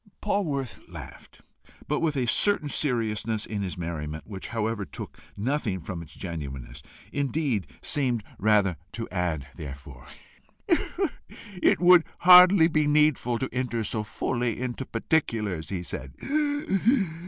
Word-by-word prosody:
Polwarth 150 - -1
laughed, - - -11 0.5
but 150 - 0
with 160 -3 0
a 130 - +1
certain 155 - +2
seriousness 115 -5 -1
in 105 -2 -4
his 95 -3 -4
merriment, 80 -3 -5
which 100 -3 -7
however 110 -2 -2
took - - -9 0.2
nothing 115 -3 -1
from 85 0 -6
its 85 - -11
genuineness, 70 -7 -6 0.3
indeed 140 - 0 0.2
seemed 125 -6 0 0.2
rather 100 -4 +3 0.2
to - - -4
add 90 -6 -1
thereto. 70 -4 -9 1.6
"It - - +4
would 180 -1 +7 0.2
hardly 180 -1 +9
be 155 -2 +1
needful 150 -5 +3
to 130 - -3
enter 125 -2 -1
so 110 +1 -1
fully 120 +2 -2
into 130 +1 -4
particulars," 110 - -1
he 95 -3 -3
said. 65 -5 -7
115 Hz, 125 wpm, -27 LUFS, 90-145 Hz, 1.6 s, hardly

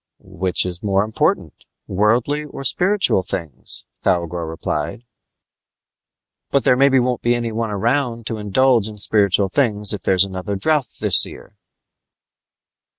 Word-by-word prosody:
"Which 95 -1 +1
is 90 -1 -5
more 100 -1 +1
important, 110 +1 -1 0.3
worldly 115 +9 +1
or 140 -2 -9
spiritual 190 - +2
things?" 85 -6 -6 0.2
Thougor 85 -1 -1
replied. 80 +7 -4 1.5
"But 140 - +1
there 125 - +4
maybe 135 +1 +4
won't 125 -1 0
be 120 0 +2
anyone 115 -1 -3
around 115 +3 -1
to 110 -1 -4
indulge 115 +2 +2
in 105 -1 -9
spiritual 100 -1 +2
things 105 -4 +2
if 105 - -5
there's 95 0 +3
another 95 +1 -5
drouth 135 +6 0
this - - +4
year!" - - -13
110 Hz, 130 wpm, -19 LUFS, 95-125 Hz, 1.5 s, there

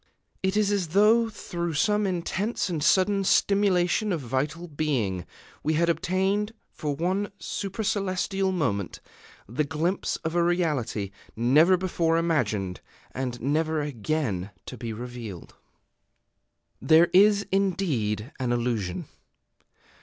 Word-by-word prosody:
It 190 +2 0
is 210 -1 +2
as 200 -4 0
though, 215 +6 +4
through 170 -5 -4
some 210 +4 +2
intense 190 +4 -1
and 160 -4 -2
sudden 195 +5 +3
stimulation 200 +1 +2
of 170 - 0
vital 140 +7 -2
being, 130 - -1 0.3
we 155 - 0
had 170 +2 +2
obtained 190 +5 0 0.2
for 150 -2 -3
one 185 +6 -1
supercelestial 195 -1 -1
moment 125 - -1 0.5
the 125 +9 -1
glimpse 160 +5 -1
of 160 - -2
a 175 - +2
reality, 150 - 0 0.2
never 150 +11 +5
before 170 -3 +1
imagined, 110 - 0 0.3
and 125 -2 -4
never 155 +4 0
again 130 - -2 0.2
to - - -7
be 115 -1 -5
revealed. 115 -5 -7 1.3
There 165 +2 +5
is, 200 +2 +5
indeed, 155 - 0
an 125 -2 -1
illusion. 115 -7 -1
165 Hz, 115 wpm, -26 LUFS, 125-190 Hz, 1.3 s, never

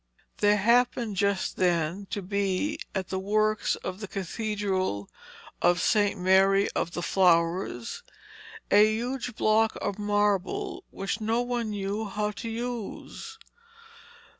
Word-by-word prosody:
There 205 0 +4
happened 235 0 +2
just 200 -1 0
then 175 +2 0
to 205 -1 -4
be 200 +8 -1 0.2
at 190 -1 -2
the 190 - -2
works 215 +2 +1
of 185 - -6
the 210 - -6
Cathedral 190 - -2 0.5
of 175 +1 +4
St. 205 +1 +2
Mary 195 +2 +4
of 170 - -2
the 175 - -3
Flowers 170 -8 +1 0.7
a 205 +1 +7
huge 245 0 -3
block 220 0 +2
of 205 - -3
marble 205 -2 0
which 195 +3 -4
no 225 +2 +1
one 245 -2 -2
knew 205 +1 -3
how 210 +1 -2
to 225 +2 -6
use. 240 - -6
205 Hz, 125 wpm, -27 LUFS, 190-220 Hz, 0.7 s, a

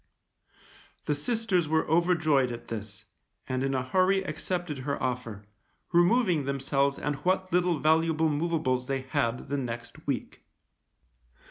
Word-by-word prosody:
The 150 - +1
sisters 185 +2 0
were 160 +1 +1
overjoyed 160 -6 +3
at 120 0 -8
this, 105 -3 -7 0.4
and 130 0 -1
in 135 0 0
a 130 - 0
hurry 185 +7 +2
accepted 175 -2 -3
her 140 +2 -2
offer, 120 -5 -3 0.5
removing 175 - +3
themselves 140 0 0
and 145 -1 -2
what 185 +4 0
little 180 -2 +3
valuable 160 +1 +3
movables 145 -5 0
they 135 -1 -1
had 125 -2 -1
the 140 - 0
next 120 +4 -6
week. 135 -5 -3
150 Hz, 130 wpm, -28 LUFS, 130-175 Hz, 0.5 s, overjoyed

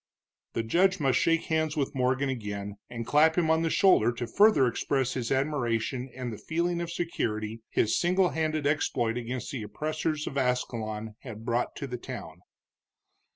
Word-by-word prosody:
The 115 - -1
judge 185 +11 +3
must 135 -4 +2
shake 165 0 +2
hands 160 -1 0
with 140 -1 -1
Morgan 130 +1 +1
again, 105 -5 -4
and 115 -1 -5
clap 155 +5 +4
him 160 -2 +3
on 160 0 +3
the 165 - +1
shoulder 160 - +4
to 120 0 -4
further 195 - +5
express 130 +2 0
his 120 -3 -3
admiration 130 -2 0
and 125 -2 -4
the 105 - -8
feeling 170 +1 -1
of 170 - -3
security 115 -10 -2
his 110 - +2
single 180 +1 +3
handed 155 -2 -1
exploit 120 -6 +1
against 125 +2 -4
the 135 -5 -4
oppressors 155 +7 -2
of 140 - -2
Ascalon 110 -4 -2
had 115 -4 -9
brought 120 0 0
to 140 - -5
the 125 -2 -5
town. 90 -10 -8
130 Hz, 170 wpm, -28 LUFS, 115-155 Hz, -, further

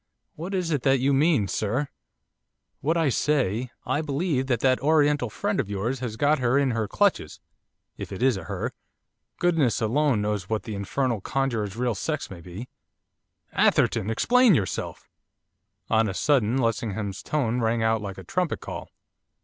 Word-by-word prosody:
'What 180 +5 -5
is 180 -3 -1
it 145 -4 +1
that 135 0 +3
you 135 +2 +2
mean, 140 - +3
sir?' 110 +9 -1 0.9
'What 160 +4 0
I 160 -4 +2
say, 125 -4 0 0.2
I 150 - 0
believe 145 -2 -1
that 120 -4 0
that 130 -1 +3
Oriental 145 -3 +2
friend 205 - -2
of 115 -7 -1
yours 110 +6 -2
has 120 -4 -4
got 145 +5 +2
her 125 +1 +2
in 140 -2 +2
her 115 -2 -1
clutches, 195 - 0 0.6
if - - -7
it 100 +5 -4
is 130 -3 +4
a 95 -4 -6
"her;" - - -4 0.6
goodness 160 - +2
alone 130 +2 +2
knows 105 -2 -2
what 110 -1 -1
the 110 - -6
infernal 115 +3 -1
conjurer's 115 -5 -1
real 120 0 0
sex 150 +7 -3
may 90 -3 -9
be.' 90 +8 -8 0.9
'Atherton! 100 - +2
Explain 240 - +4
yourself!' 95 -7 -3 0.8
On 110 -1 +2
a 95 - -5
sudden 130 -3 +2
Lessingham's 110 -4 -2
tones 125 -5 -1
rang 115 0 +1
out 110 -1 +2
like 100 -2 -6
a - - -8
trumpet 180 -3 -1
call. - - -7
125 Hz, 165 wpm, -25 LUFS, 110-145 Hz, 0.9 s, is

